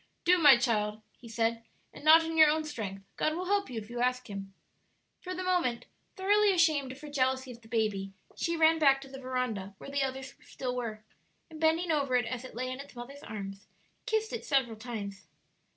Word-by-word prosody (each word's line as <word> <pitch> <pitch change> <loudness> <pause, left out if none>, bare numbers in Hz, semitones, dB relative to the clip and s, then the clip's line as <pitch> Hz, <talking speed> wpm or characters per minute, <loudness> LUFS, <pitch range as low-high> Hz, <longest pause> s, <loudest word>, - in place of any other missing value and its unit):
"Do, 360 +1 +5
my 290 -6 +8
child," 215 -3 0
he 235 - -13
said; 230 0 0 0.3
"and - - -12
not 320 +2 +8
in 325 0 -3
your 315 -1 +8
own 315 +1 +1
strength; 205 -10 -6
God 310 - +1
will 360 +2 -3
help 400 +1 +1
you 245 - -6
if 210 - -10
you 240 +1 -6
ask 250 0 0
Him." 195 -1 -6 0.7
For 365 0 -6
the 370 - -4
moment 350 -10 0 0.3
thoroughly 410 +2 +4
ashamed 310 -7 +2
of 260 - -10
her 300 - -8
jealousy 260 -2 0
of 235 -1 -12
the 225 - -17
baby, 210 -4 -1 0.2
she 335 0 -1
ran 320 0 +5
back 275 -3 +5
to 270 - -10
the 270 0 -9
veranda, 250 -7 -3
where 275 - -10
the 280 0 0
others 265 0 -3
still 250 -1 -5
were, 220 -3 -4 0.5
and 315 0 -10
bending 325 +2 +2
over 280 -4 +1
it 245 -2 +2
as 250 +1 -4
it 255 - -10
lay 255 +1 -3
its 275 0 -10
mother's 265 +4 -9
arms, 195 -4 -7 0.4
kissed 440 0 0
it 470 - -4
several 265 -5 +1
times. 210 -4 -7
260 Hz, 210 wpm, -30 LUFS, 230-315 Hz, 0.7 s, my